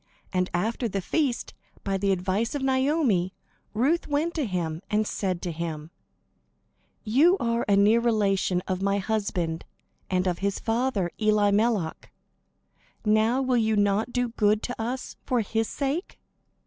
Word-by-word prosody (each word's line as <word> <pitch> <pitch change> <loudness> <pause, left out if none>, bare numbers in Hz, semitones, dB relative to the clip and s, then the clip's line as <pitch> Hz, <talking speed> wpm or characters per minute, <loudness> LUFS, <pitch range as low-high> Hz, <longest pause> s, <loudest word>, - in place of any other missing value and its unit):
And 180 0 +1
after 225 +7 -1
the 200 -2 -2
feast, 260 - -1 0.3
by 195 -1 -1
the 195 +1 +1
advice 190 +7 0
of 280 - -2
Naomi, 260 - +1 0.4
Ruth 285 +10 +1
went 305 +3 0
to 300 -7 -1
him, 170 -4 -3
and 215 +1 +1
said 185 -4 -2
to 175 - -2
him: 160 -1 -5 1.1
"You 290 - +4
are 230 0 0
a 200 - +5
near 210 +3 +5
relation 200 -6 +1
of 185 -1 -2
my 200 0 +1
husband 195 -6 -2 0.5
and 185 0 +1
of 180 -2 -1
his 200 0 -1
father, 225 -6 0
Elimelech. 210 -3 +1 0.9
Now 220 +5 +3
will 255 -1 +2
you 220 -1 +2
not 205 +3 +1
do 245 -1 0
good 215 -2 +1
to 245 -2 -4
us 250 +3 -4
for 250 -2 +1
his 225 +1 -1
sake?" 285 +6 -3
215 Hz, 150 wpm, -26 LUFS, 190-245 Hz, 1.1 s, a